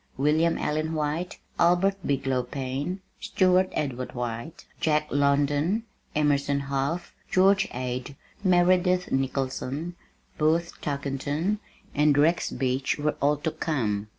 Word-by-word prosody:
William 155 +4 +2
Allen 155 +2 -1
White, 155 +4 -2 0.2
Albert 180 +3 +4
Bigelow 135 -2 0
Payne, 135 +8 -4 0.2
Stewart 185 -5 +3
Edward 130 -4 -3
White, 120 +4 -5
Jack 150 -1 +2
London, 145 +8 +2 0.3
Emerson 145 -1 +2
Hough, 140 +5 -2 0.2
George 195 +1 +4
Ade, 125 +2 -4 0.3
Meredith 180 0 +3
Nicholson, 135 +4 -2 0.4
Booth 165 +3 +2
Tarkington, 145 +7 -1 0.3
and 150 -1 +3
Rex 165 +4 +3
Beach 130 0 -1
were 150 0 0
all 145 +1 +3
to 155 +2 -2
come. 110 -12 -1
150 Hz, 110 wpm, -26 LUFS, 135-175 Hz, 0.4 s, Albert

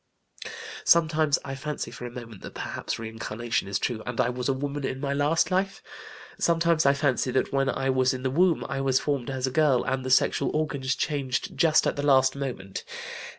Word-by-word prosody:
Sometimes 155 -3 +4
I 135 - -4
fancy 150 +2 -4
for 125 - -7
a - - -6
moment 115 -4 -10
that - - -9
perhaps - - -4
reincarnation 115 0 -3
is 100 0 0
true 110 +2 -2
and 125 0 -4
I 125 -1 +3
was 125 0 -2
a - - +3
woman 140 +1 -4
in 130 0 -3
my 140 0 -1
last 145 +5 +2
life. 195 +1 0 0.6
Sometimes 165 -2 +3
I 140 - +5
fancy 140 -3 +1
that 130 - 0
when 135 0 +2
I 135 -1 0
was 130 -1 +3
in 130 -1 -5
the 130 - 0
womb 175 +3 +3
I 135 - -2
was 135 -1 +2
formed 140 -4 -2
as 130 -1 -1
a 130 - -2
girl 145 -3 +3
and 130 0 -1
the 130 - -3
sexual 130 - +3
organs 140 -4 -1
changed 135 -3 -2
just 160 -2 +4
at - - 0
the - - -1
last 130 -2 +4
moment. 125 -9 -5
135 Hz, 205 wpm, -26 LUFS, 125-150 Hz, 0.6 s, I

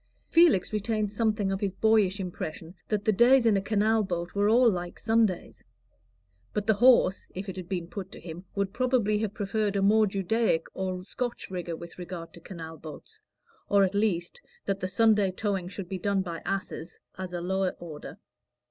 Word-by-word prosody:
Felix 330 - +4
retained 215 -1 -1
something 215 -2 +1
of 195 - -2
his 200 -3 -1
boyish 210 -2 +3
impression 170 -2 -6 0.2
that 210 -1 -1
the 220 - +4
days 240 +4 +5
in 220 -2 +5
a 195 - +2
canal 215 +2 +2
boat 175 -3 -3
were 205 +1 +2
all 240 +3 +5
like 175 -5 -1
Sundays; 220 -5 0 0.9
but 210 - -1
the 220 - +4
horse, 220 -4 +4
if 190 +2 -5
it 190 - -5
had 185 -2 -8
been 180 -3 -2
put 190 +2 -7
to - - -10
him, 170 +1 -8
would 200 -1 -1
probably 240 -4 +1
have 215 -1 -3
preferred 205 0 -1
a 200 - +1
more 215 +2 +5
Judaic 195 -2 +1
or 185 -1 -3
Scotch 245 -2 -4
rigor 175 -2 -4
with 170 +2 -11
regard 175 -2 -7
to - - -12
canal 165 -2 -9
boats, 160 - -11 0.5
or 200 -1 +5
at 190 0 +1
least 200 -5 -1 0.2
that 195 -1 -1
the 185 - -2
Sunday 210 0 +3
towing 190 -1 -2
should 190 0 -7
be 190 +1 -4
done 200 +1 +1
by 170 -3 -6
asses, 195 -4 -4 0.2
as 185 -1 -5
a 175 - -3
lower 190 +1 -1
order. 155 -4 -9
195 Hz, 190 wpm, -28 LUFS, 180-215 Hz, 0.9 s, days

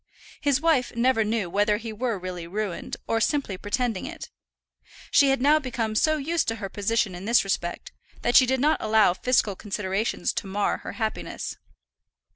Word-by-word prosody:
His 285 -3 +2
wife 295 -7 +1
never 235 -1 +3
knew 215 -3 -1
whether 205 +3 +2
he 225 0 -6
were 230 0 -2
really 180 -2 -6
ruined, 200 0 -4
or 225 0 0
simply 275 -6 0
pretending 220 +1 -2
it. - - -8 0.8
She 280 -2 +5
had 270 -1 +2
now 295 +4 +4
become 235 -6 -3
so 310 +8 +2
used 325 +4 -1
to 225 - 0
her 205 -3 -6
position 205 0 0
in 180 +2 -8
this 235 +2 +4
respect, 175 -3 -3 0.3
that 240 - +1
she 255 - +8
did 260 +1 +1
not 300 +4 +3
allow 215 -4 +4
fiscal 220 -2 +1
considerations 200 +1 -2
to - - -4
mar 200 +1 0
her - - -8
happiness. 220 -2 -4
225 Hz, 175 wpm, -25 LUFS, 200-255 Hz, 0.8 s, she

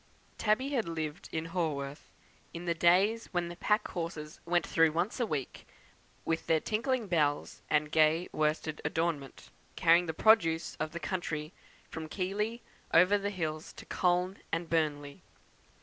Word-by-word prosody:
Tabby 225 +6 +2
had 245 -10 -1
lived 160 -1 -4
in 160 0 -2
Haworth 155 -5 -3 0.5
in 170 +1 -6
the 170 - +1
days 190 +7 +3
when 175 -1 0
the 175 - -7
pack 210 +4 +1
horses 165 -3 -5
went 175 0 +2
through 165 -1 +3
once 175 +9 -1
a 240 - +1
week, 145 -8 -4 0.6
with 165 0 -1
their 160 -1 +4
tinkling 235 - -1
bells 150 -6 0
and 150 0 +1
gay 160 +2 +3
worsted 155 0 -1
adornment, 160 -5 -2 0.2
carrying 170 +1 +4
the 160 - -2
produce 170 -7 +4
of 155 - -3
the 170 - -5
country 160 -2 -3 0.4
from 160 -1 -6
Keighley 210 +6 -2 0.3
over 180 +5 +6
the 200 0 -1
hills 160 -5 -4
to - - -11
Colne 180 +1 +1
and 165 +1 -1
Burnley. 145 -3 -1
170 Hz, 150 wpm, -31 LUFS, 155-185 Hz, 0.6 s, over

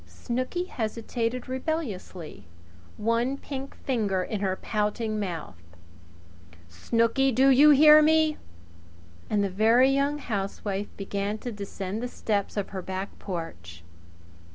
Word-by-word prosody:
Snooky 255 - -3
hesitated 230 - -3
rebelliously, 255 - -4 0.5
one 230 +5 0
pink 275 -1 -7
finger 205 -8 0
in 205 +1 -4
her 190 -2 0
pouting 215 +2 -2
mouth. 170 - -5 1.1
"Snooky! 230 - +1
Do 260 +3 +4
you 285 +4 +7
hear 300 +1 +8
me?" 315 0 +3 0.9
And 205 -1 +1
the 200 - 0
Very 230 +7 +4
Young 280 +2 +1 0.4
Wife 200 0 -2
began 200 +1 -3
to 245 +2 -6
descend 200 0 -5
the 245 - -2
steps 210 -4 -2
of 200 - -2
her 190 -2 -5
back 190 +2 -6
porch. 90 - -7
220 Hz, 120 wpm, -27 LUFS, 195-260 Hz, 1.1 s, hear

